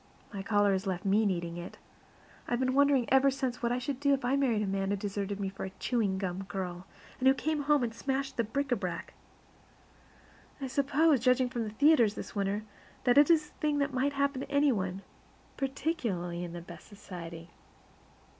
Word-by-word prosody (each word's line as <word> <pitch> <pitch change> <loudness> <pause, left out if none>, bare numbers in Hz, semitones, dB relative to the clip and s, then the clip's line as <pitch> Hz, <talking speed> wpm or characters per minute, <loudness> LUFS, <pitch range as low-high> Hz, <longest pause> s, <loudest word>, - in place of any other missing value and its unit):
My 195 - -4
caller 205 0 +2
has 190 +1 -1
left 185 +1 -3
me 205 +2 +3
needing 170 -2 -2
it. 175 - -8 0.7
I - - -2
have 240 - +1
been 255 0 +1
wondering 280 -2 +4
ever 270 +1 +6
since 260 -2 -3
what 235 -1 0
I 245 - +1
should 255 +1 -3
do 280 0 +3
if 270 - -6
I 255 +3 +2
married 245 -6 +2
a - - -1
man 195 0 -1
who 205 - +1
deserted 200 0 -3
me 200 - -1
for 195 0 -6
a 190 - -3
chewing 215 -6 0
gum 190 0 -3
girl, 185 -2 -5 0.3
and 260 - +2
who 265 - +6
came 310 +2 -1
home 290 -2 +3
and 230 -2 -2
smashed 270 +3 -2
the 235 - +1
bric 275 +5 -2
a - - +5
brac. 185 -5 -5 1.5
I 275 - -4
suppose, 280 +2 +3
judging 255 +1 +3
from 235 -3 -2
the - - -4
theaters 235 -2 +4
this - - -7
winter, 200 +1 -1 0.4
that 250 +2 +5
it 295 - +6
is 310 -3 +4
a - - -26
thing 300 -1 +1
that 280 -1 0
might 270 +2 +1
happen 280 -1 0
to - - -7
any 285 0 +3
one, 190 -3 -2 0.5
particularly 245 - -2
in 170 -1 -6
the 175 - -6
best 170 -1 -12
society. 170 -4 -9
235 Hz, 210 wpm, -30 LUFS, 195-275 Hz, 1.5 s, ever